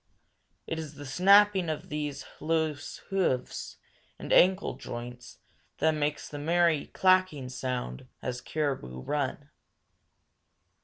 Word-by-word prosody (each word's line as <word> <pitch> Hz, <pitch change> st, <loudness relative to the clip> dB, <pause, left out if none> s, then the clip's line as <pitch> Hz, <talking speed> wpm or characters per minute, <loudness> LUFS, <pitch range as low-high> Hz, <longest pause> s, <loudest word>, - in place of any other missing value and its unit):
It 165 Hz, -, -3 dB
is 155 Hz, -2 st, -7 dB
the 145 Hz, +1 st, -9 dB
snapping 190 Hz, +4 st, +5 dB
of 155 Hz, -, -4 dB
these 150 Hz, -2 st, -4 dB
loose 160 Hz, -1 st, -1 dB
hoofs 180 Hz, -10 st, -1 dB, 0.4 s
and -, -, -3 dB
ankle 185 Hz, -3 st, +4 dB
joints 125 Hz, -1 st, -8 dB, 0.4 s
that 160 Hz, +2 st, +3 dB
makes 150 Hz, -1 st, -1 dB
the 145 Hz, -, -7 dB
merry 165 Hz, 0 st, +2 dB
clacking 185 Hz, -8 st, +2 dB
sound 125 Hz, -, -4 dB
as 125 Hz, -1 st, -4 dB
caribou 135 Hz, -, -3 dB
run. 145 Hz, -, -3 dB
150 Hz, 110 wpm, -29 LUFS, 130-170 Hz, 0.4 s, snapping